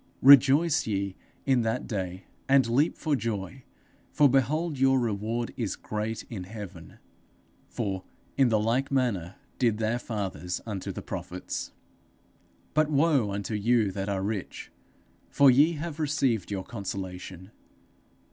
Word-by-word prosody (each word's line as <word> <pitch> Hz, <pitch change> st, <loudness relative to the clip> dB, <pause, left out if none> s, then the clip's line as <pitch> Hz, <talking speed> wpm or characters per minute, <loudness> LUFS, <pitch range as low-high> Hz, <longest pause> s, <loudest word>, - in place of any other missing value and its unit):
Rejoice 140 Hz, +4 st, +6 dB
ye 100 Hz, -2 st, -2 dB, 0.3 s
in 130 Hz, -3 st, +3 dB
that 115 Hz, +2 st, -1 dB
day, 95 Hz, -4 st, -4 dB, 0.3 s
and 135 Hz, -2 st, +5 dB
leap 135 Hz, +7 st, +2 dB
for 155 Hz, -3 st, 0 dB
joy, 115 Hz, +1 st, -4 dB, 0.5 s
for 145 Hz, -, +5 dB
behold 145 Hz, +3 st, +1 dB
your 135 Hz, 0 st, +4 dB
reward 115 Hz, +1 st, -2 dB
is 115 Hz, -5 st, -2 dB
great 110 Hz, +1 st, -4 dB
in 95 Hz, -6 st, -6 dB
heaven; 95 Hz, -5 st, -10 dB, 0.7 s
for 95 Hz, -5 st, -3 dB, 0.3 s
in 135 Hz, -3 st, +4 dB
the 110 Hz, -2 st, +3 dB
like 120 Hz, +6 st, 0 dB
manner 110 Hz, -10 st, -1 dB, 0.2 s
did 115 Hz, -4 st, +2 dB
their 110 Hz, +2 st, 0 dB
fathers 95 Hz, -6 st, -4 dB
unto 105 Hz, -4 st, -4 dB
the -, -, -7 dB
prophets._ -, -, -5 dB, 1.0 s
_'But 155 Hz, 0 st, +3 dB
woe 145 Hz, -6 st, +3 dB
unto 100 Hz, +2 st, -4 dB
you 110 Hz, 0 st, +2 dB
that 95 Hz, +1 st, -4 dB
are 95 Hz, -1 st, -1 dB
rich! 100 Hz, -2 st, -4 dB, 0.6 s
for 140 Hz, -2 st, +6 dB
ye 145 Hz, +7 st, +5 dB
have 160 Hz, 0 st, -5 dB
received 135 Hz, -, 0 dB
your 100 Hz, -2 st, -3 dB
consolation. 95 Hz, -2 st, -7 dB
115 Hz, 135 wpm, -27 LUFS, 100-135 Hz, 1.0 s, Rejoice